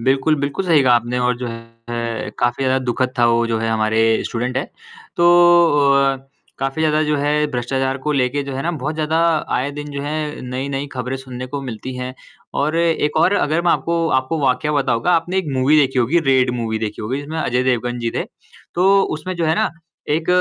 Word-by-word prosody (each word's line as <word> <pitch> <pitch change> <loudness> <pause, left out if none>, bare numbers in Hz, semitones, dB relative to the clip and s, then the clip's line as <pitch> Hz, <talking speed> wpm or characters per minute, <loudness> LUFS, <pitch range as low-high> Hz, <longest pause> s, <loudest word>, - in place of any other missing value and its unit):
बिल्कुल, 135 +5 +2
बिल्कुल 140 +7 -2
सही 165 -5 +4
कहा 125 -2 +5
आपने 120 +1 0
और 125 -1 +1
जो 125 - -4
है 115 -1 -6
काफ़ी 120 +2 0
ज़्यादा 130 0 +2
दुखद 125 +1 -1
था, 120 - +5
वो 115 0 +2
जो 115 -1 -1
है 115 0 -1
हमारे 110 0 +2
स्टूडेंट 125 +2 -3
है, 135 - 0 0.5
तो 170 - +3 0.7
अ, 135 0 +3 0.4
काफ़ी 135 +4 -2
ज़्यादा 155 0 +2
जो 150 -1 0
है 150 +1 +1
भ्रष्टाचार 130 +2 -1
को 150 +3 -2
लेके 140 0 0
जो 140 0 -6
है 135 - -3
ना 170 - 0
बहुत 150 -1 -4
ज़्यादा 155 +1 0 0.4
आए 135 +3 -1
दिन 145 0 -6
जो 140 -1 -5
है, 150 +1 -3
नई-नई 135 +2 -3
खबरें 125 0 -3
सुनने 130 -1 -7
को 140 +2 -5
मिलती 125 0 -6
हैं 125 0 -5 0.4
और 155 +3 0
एक 165 -3 +1
और 165 +4 +4
अगर 160 -1 +1
मैं 175 - +3
आपको 170 0 0
आपको 130 +5 -3
वाकया 130 +4 +1
बताऊँगा, 130 -1 +1
आपने 175 +3 +1
एक 190 - -2
मूवी 135 +4 +4
देखी 135 -2 +1
होगी, 125 +8 +3
रेड 130 -5 +2
मूवी 110 -1 -2
देखी 110 -1 -4
होगी 125 +6 -2
जिसमें 155 +3 -6
अजय 125 -3 0
देवगन 125 -1 0
जी 115 -1 -2
थे। - - -1 0.5
तो 195 +3 +4
उसमें 170 +4 -4
जो 170 - -1
है 160 - +2
ना - - +1 0.4
एक 160 +2 0
135 Hz, 210 wpm, -19 LUFS, 125-150 Hz, 0.7 s, कहा